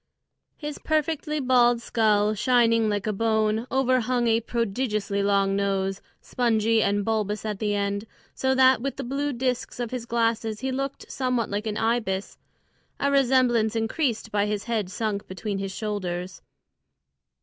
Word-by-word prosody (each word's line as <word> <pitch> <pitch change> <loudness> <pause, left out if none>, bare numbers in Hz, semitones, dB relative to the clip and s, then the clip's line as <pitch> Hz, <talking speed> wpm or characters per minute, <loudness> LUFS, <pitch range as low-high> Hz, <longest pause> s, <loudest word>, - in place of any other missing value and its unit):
His 295 -1 -6
perfectly 305 -1 -1
bald 245 -3 +4
skull, 215 -3 +2
shining 230 -1 +3
like 205 -2 -1
a 215 - 0
bone, 220 +1 +1
overhung 255 -2 +1
a 225 0 +3
prodigiously 215 -3 -1
long 200 -1 +2
nose, 195 -1 -1 0.2
spongy 225 -2 +1
and 205 -1 +1
bulbous 215 -1 -1
at 210 -2 -3
the 210 -1 0
end, 200 +1 -1 0.3
so 265 0 0
that 260 -2 +5
with 275 +2 -3
the 270 - -4
blue 280 +3 -2
discs 250 -1 -2
of 240 -2 -3
his 245 -2 -5
glasses 230 -2 0
he 265 0 -1
looked 275 +1 -4
somewhat 250 -5 -1
like 205 +2 -2
an 210 -1 -2
ibis, 225 -4 -1 0.6
a 280 - +1
resemblance 250 -5 +3
increased 225 0 -1
by 205 0 +1
his 210 -1 -2
head 220 -5 -2
sunk 205 0 -3
between 195 +2 -4
his 195 0 -3
shoulders. 185 -4 -4
225 Hz, 150 wpm, -25 LUFS, 205-250 Hz, 0.6 s, that